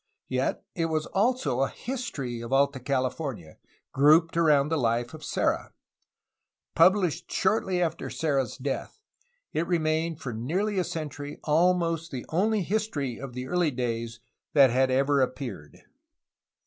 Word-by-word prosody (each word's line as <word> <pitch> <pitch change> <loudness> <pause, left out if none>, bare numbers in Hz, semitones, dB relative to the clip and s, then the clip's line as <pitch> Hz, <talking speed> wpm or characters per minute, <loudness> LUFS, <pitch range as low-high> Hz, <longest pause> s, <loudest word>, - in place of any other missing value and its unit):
Yet 130 0 -1
it 165 -2 0
was 155 -1 -1
also 195 - +1
a 135 - +2
history 230 - -5
of 115 +1 -7
Alta 140 0 +2
California, 130 - -3 0.3
grouped 155 +4 +5
around 150 -4 +4
the 160 - +1
Hfe 120 0 0
of 155 -1 -10
Serra. - - -1 1.0
PubHshed 175 -1 +4
shortly 190 -2 +1
after 165 -1 -3
Serra's 140 -7 -1
death, 135 - -4 0.5
it 165 +2 0
remained 160 -1 0
for 125 -6 -5
nearly 185 - -1
a - - +2
century 145 -3 -6
almost 165 +1 +2
the 130 -5 -6
only 205 +4 +1
his 215 +5 0
tory 140 - -4
of 135 -1 -7
the 125 +1 -5
early 175 +3 +1
days 115 -3 -3 0.3
that 135 -4 +6
had 130 +2 +3
ever 140 +2 +3
appeared. 125 - -4
150 Hz, 140 wpm, -27 LUFS, 130-170 Hz, 1.0 s, that